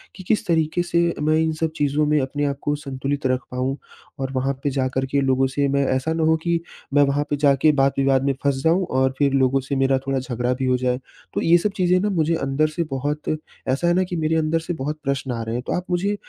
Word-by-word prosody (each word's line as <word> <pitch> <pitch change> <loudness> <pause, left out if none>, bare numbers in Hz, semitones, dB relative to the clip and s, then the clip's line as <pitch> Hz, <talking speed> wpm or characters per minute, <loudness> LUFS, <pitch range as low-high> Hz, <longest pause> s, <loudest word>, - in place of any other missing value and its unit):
कि 190 - -10
किस 215 - +1
तरीके 160 0 +1
से 170 0 0 0.2
मैं 155 +1 +3
इन 160 0 +1
सब 160 -1 0
चीज़ों 145 +1 +1
में 150 0 +2
अपने 145 +2 -2
आप 140 -1 -1
को 145 - 0
संतुलित 140 -1 -4
रख 130 0 0
पाऊँ? 130 +2 -2 0.4
और 135 0 -3
वहाँ 135 +1 0
पे 145 - +1
जाकर 130 0 -1
के 140 - +2
लोगों 135 0 +2
से 140 +2 0
मैं 140 0 +2
ऐसा 130 +5 -1
ना 160 0 0
हो 160 0 +4
कि, 170 -1 +1 0.3
मैं 145 0 +6
वहाँ 140 +1 +1
पे 145 - +1
जा 140 -1 +4
के 155 - +6
बात-विवाद 135 -1 +2
में 140 - +2
फँस 140 -1 +2
जाऊँ 175 +3 +3
और 130 0 +1
फिर 140 -2 +2
लोगों 135 0 +3
से 135 +2 -3
मेरा 135 0 +2
थोड़ा 135 -1 +1
झगड़ा 125 -1 -1
भी 130 +1 -3
हो 130 0 +2
जाए। 125 0 0 0.3
तो - - -1
ये 170 +1 +5
सब 205 +4 -1
चीज़ें 180 -1 +3
ना 205 +3 0
मुझे 165 -4 +1
अंदर 140 +1 +1
से 170 +2 -2
बहुत, 145 +3 -2 0.3
ऐसा 135 +6 +1
है 175 - +4
ना 185 +2 +2
कि 180 - -3
मेरे 160 0 0
अंदर 160 +1 +1
से 175 - -1
बहुत 150 +2 -3
प्रश्न 135 -1 -2
आ 115 -1 -3
रहे 115 +1 -4
हैं। 125 - -3
तो - - -1
आप 180 - -4
मुझे 195 +4 +1
140 Hz, 260 wpm, -22 LUFS, 135-160 Hz, 0.4 s, मैं